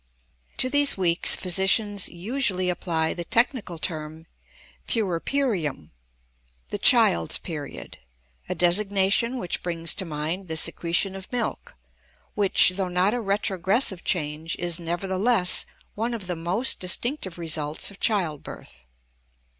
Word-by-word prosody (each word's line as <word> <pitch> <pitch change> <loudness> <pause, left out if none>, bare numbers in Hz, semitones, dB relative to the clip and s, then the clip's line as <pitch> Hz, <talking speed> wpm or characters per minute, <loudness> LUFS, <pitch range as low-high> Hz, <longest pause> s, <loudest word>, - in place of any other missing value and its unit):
To - - +4
these 285 -1 +3
weeks 175 -2 +4
physicians 195 +2 +1
usually 185 -1 -1
apply 165 -3 -2
the 175 - -6
technical 230 -3 -1
term 155 -1 -4 0.6
puerperium, 190 - -2 0.8
the - - -4
child's 85 -1 +5
period, 150 -5 -8 0.5
a 180 - -2
designation 195 +6 +1
which 180 -7 -4
brings 165 -1 0
to 195 - +1
mind 165 +4 -4
the 160 -1 -2
secretion 170 +4 +1
of 190 0 -10
milk 240 - -4 0.6
which, 200 -3 +5
though 185 0 -2
not 180 +3 0
a 245 - -2
retrogressive 195 0 0
change, 160 -1 -2
is, 175 -1 0
nevertheless, 185 +4 +2 0.3
one 230 +3 -3
of 210 -5 -8
the 180 -1 -4
most 180 +10 0
distinctive 190 - -1
results 155 0 -1
of 195 - -16
childbirth. 155 - -3
185 Hz, 120 wpm, -24 LUFS, 165-205 Hz, 0.8 s, child's